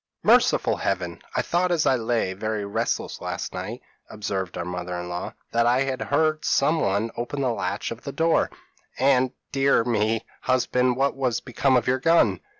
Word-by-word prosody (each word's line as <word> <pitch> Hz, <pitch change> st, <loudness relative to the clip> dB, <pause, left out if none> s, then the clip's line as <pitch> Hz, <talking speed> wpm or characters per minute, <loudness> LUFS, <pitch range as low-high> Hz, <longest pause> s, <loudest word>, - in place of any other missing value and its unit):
p> -, -, +1 dB
"'Merciful -, -, +4 dB
Heaven! 90 Hz, -3 st, -2 dB
I 125 Hz, -, +1 dB
thought, 180 Hz, +5 st, +1 dB
as 165 Hz, -3 st, +2 dB
lay 115 Hz, -6 st, +1 dB
very 105 Hz, +1 st, -3 dB
restless 100 Hz, -, -2 dB
last -, -, -4 dB
night,' -, -, -6 dB, 0.3 s
observed 95 Hz, -4 st, -4 dB
our 85 Hz, -, -3 dB
mother 90 Hz, 0 st, -4 dB
in 90 Hz, 0 st, -6 dB
law, 90 Hz, 0 st, -5 dB, 0.2 s
'that 115 Hz, 0 st, +2 dB
I 125 Hz, +3 st, +3 dB, 0.2 s
heard 155 Hz, +1 st, +1 dB
somebody 115 Hz, -8 st, +1 dB
open 120 Hz, +4 st, -3 dB
the 130 Hz, -2 st, +1 dB
latch 100 Hz, -1 st, -3 dB
of 115 Hz, +1 st, -7 dB
the 140 Hz, -, -6 dB
door; 165 Hz, +2 st, +2 dB, 0.5 s
and, 130 Hz, -1 st, +3 dB, 0.2 s
dear 135 Hz, -3 st, +3 dB
me, 110 Hz, -1 st, 0 dB, 0.2 s
husband, 125 Hz, -1 st, +1 dB
what 135 Hz, +2 st, +1 dB
has 125 Hz, -4 st, 0 dB
become 130 Hz, +1 st, +1 dB
of 120 Hz, -, 0 dB
your 130 Hz, +1 st, +1 dB
gun?' 130 Hz, -, +3 dB
120 Hz, 170 wpm, -24 LUFS, 100-135 Hz, 0.5 s, Merciful